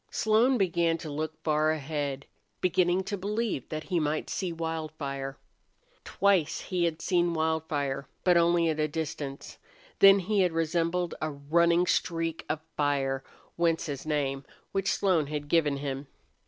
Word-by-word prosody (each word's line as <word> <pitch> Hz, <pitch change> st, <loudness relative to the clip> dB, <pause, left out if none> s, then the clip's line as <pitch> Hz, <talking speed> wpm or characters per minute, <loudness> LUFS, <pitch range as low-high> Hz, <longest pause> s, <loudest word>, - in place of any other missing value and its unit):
Slone 225 Hz, +4 st, +3 dB
began 170 Hz, -4 st, +2 dB
to 160 Hz, -2 st, -7 dB
look 155 Hz, +2 st, -4 dB
far 155 Hz, 0 st, +2 dB
ahead, 145 Hz, -2 st, -2 dB, 0.3 s
beginning 180 Hz, +1 st, +2 dB
to 200 Hz, 0 st, -4 dB
believe 210 Hz, -, -2 dB
that 155 Hz, 0 st, -4 dB
he 180 Hz, -3 st, 0 dB
might 155 Hz, 0 st, -1 dB
see 185 Hz, -3 st, -2 dB
Wildfire. 155 Hz, -4 st, -4 dB, 0.7 s
Twice 190 Hz, -6 st, +2 dB
he 180 Hz, -3 st, -1 dB
had 165 Hz, -1 st, -2 dB
seen 175 Hz, -2 st, +2 dB
Wildfire, 150 Hz, -4 st, -1 dB, 0.2 s
but 180 Hz, -1 st, +4 dB
only 170 Hz, 0 st, +4 dB
at 155 Hz, -1 st, -1 dB
a 155 Hz, -, +2 dB
distance. 145 Hz, -3 st, -5 dB, 0.4 s
Then 195 Hz, 0 st, +9 dB
he 200 Hz, +2 st, +1 dB
had 180 Hz, -3 st, +2 dB
resembled 170 Hz, +2 st, 0 dB
a 155 Hz, -, 0 dB
running 170 Hz, +4 st, +2 dB
streak 165 Hz, -2 st, -1 dB
of 155 Hz, -, -1 dB
fire, 135 Hz, -2 st, 0 dB, 0.3 s
whence 170 Hz, -1 st, +1 dB
his 140 Hz, -4 st, -5 dB
name, 140 Hz, -3 st, -1 dB, 0.3 s
which 195 Hz, -1 st, 0 dB
Slone 175 Hz, -7 st, +2 dB
had 145 Hz, 0 st, -4 dB
given 150 Hz, -3 st, +2 dB
him. 140 Hz, 0 st, -4 dB
160 Hz, 150 wpm, -28 LUFS, 145-175 Hz, 0.7 s, Then